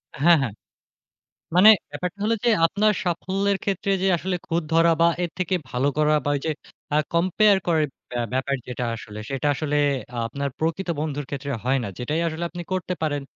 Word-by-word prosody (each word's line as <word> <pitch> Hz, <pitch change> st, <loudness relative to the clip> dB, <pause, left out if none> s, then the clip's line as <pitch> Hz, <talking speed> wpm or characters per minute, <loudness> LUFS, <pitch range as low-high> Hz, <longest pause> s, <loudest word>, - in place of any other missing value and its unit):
হ্যাঁ, 165 Hz, +3 st, +5 dB
হ্যাঁ। 115 Hz, -7 st, -2 dB, 1.0 s
মানে 210 Hz, +4 st, +9 dB, 0.2 s
ব্যাপারটা 180 Hz, +2 st, -5 dB
হলো 225 Hz, +1 st, +2 dB
যে 240 Hz, -, +4 dB, 0.2 s
আপনার 210 Hz, +5 st, +2 dB
সাফল্যের 195 Hz, +3 st, 0 dB
ক্ষেত্রে 195 Hz, 0 st, -1 dB
যে 195 Hz, -, +2 dB
আসলে 180 Hz, +2 st, -2 dB
খুঁত 170 Hz, 0 st, 0 dB
ধরা 165 Hz, +1 st, +5 dB
বা 170 Hz, -, +6 dB
এর 175 Hz, -, -1 dB
থেকে 185 Hz, 0 st, 0 dB, 0.2 s
ভালো 125 Hz, +3 st, +1 dB
করা 150 Hz, 0 st, +3 dB
বা 145 Hz, -, 0 dB
ওই 140 Hz, -, -1 dB
যে -, -, +1 dB, 0.4 s
আ -, -, +4 dB, 0.2 s
কম্পেয়ার 185 Hz, +4 st, +4 dB
করার 160 Hz, -3 st, +3 dB, 0.3 s
ব্যা 120 Hz, -1 st, -2 dB
ব্যাপার 135 Hz, +1 st, 0 dB
যেটা 125 Hz, 0 st, -4 dB
আসলে, 105 Hz, -1 st, -9 dB
সেটা 135 Hz, +2 st, -2 dB
আসলে 150 Hz, 0 st, -1 dB, 0.5 s
আপনার 140 Hz, +4 st, -3 dB
প্রকৃত 165 Hz, +4 st, -2 dB
বন্ধুর 145 Hz, -2 st, -3 dB
ক্ষেত্রে 140 Hz, 0 st, -4 dB
হয় 135 Hz, +2 st, +2 dB
না। -, -, -3 dB
যেটাই 150 Hz, +7 st, -1 dB
আসলে 165 Hz, +1 st, -4 dB
আপনি 175 Hz, +1 st, -6 dB
করতে 185 Hz, -1 st, -1 dB
পারেন, 145 Hz, -2 st, -1 dB
165 Hz, 185 wpm, -24 LUFS, 140-185 Hz, 1.0 s, মানে